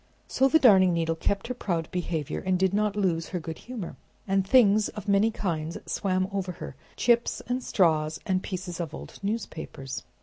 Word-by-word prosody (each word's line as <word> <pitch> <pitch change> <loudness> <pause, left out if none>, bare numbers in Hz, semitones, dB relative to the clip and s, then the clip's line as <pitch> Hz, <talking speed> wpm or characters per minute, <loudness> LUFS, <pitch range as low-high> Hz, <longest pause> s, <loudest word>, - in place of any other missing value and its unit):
So 265 - +3
the 320 - +5
Darning 190 - +6
Needle 165 -1 +1
kept 195 +4 -1
her 250 - -3
proud 170 -9 -2
behavior, 165 -5 -2
and 185 -1 +1
did 190 +1 +2
not 210 0 +1
lose 175 -5 0
her 180 - -3
good 160 -1 -7
humor. 240 -8 -7 0.3
And 195 0 +2
things 215 -3 +5
of 210 -2 -9
many 200 +2 +4
kinds 165 -7 -3
swam 185 -2 0
over 190 -2 -2
her, 150 - -8 0.2
chips 235 -1 +2
and 250 +1 -1
straws 160 -3 +2
and 185 -1 +1
pieces 180 -2 -5
of 160 -3 -4
old - - -10
newspapers. 180 - -4
185 Hz, 180 wpm, -27 LUFS, 165-210 Hz, 0.3 s, Darning